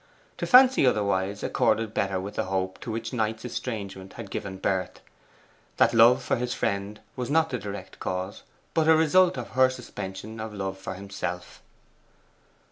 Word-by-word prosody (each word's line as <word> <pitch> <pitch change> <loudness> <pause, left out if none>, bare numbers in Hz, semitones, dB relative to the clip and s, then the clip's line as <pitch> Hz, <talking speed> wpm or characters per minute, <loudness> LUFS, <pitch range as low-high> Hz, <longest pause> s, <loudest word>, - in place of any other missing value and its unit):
To - - -2
fancy 260 - +7
otherwise 100 -4 +1
accorded 110 -1 +1
better 95 -1 0
with 100 +2 -6
the - - -2
hope 95 0 -2
to 115 - -6
which 115 +2 -4
Knight's 110 -1 -1
estrangement 100 -6 -5
had 110 -4 -9
given 95 -1 -5
birth: 95 -1 -2 0.8
that - - +4
love 120 +3 +6
for - - 0
his 125 +1 -2
friend 100 +2 -2 0.2
was 125 -1 -4
not 160 +2 +2
the 125 - -2
direct 100 -2 -8
cause, 95 +1 -4 0.3
but 160 -1 +2
a 160 - +7
result 180 +4 +4
of - - -5
her 130 +3 +4
suspension 110 -3 -7
of 110 -1 -6
love 95 -1 -4
for 95 - -6
himself. 95 -2 -6
105 Hz, 165 wpm, -26 LUFS, 95-125 Hz, 0.8 s, fancy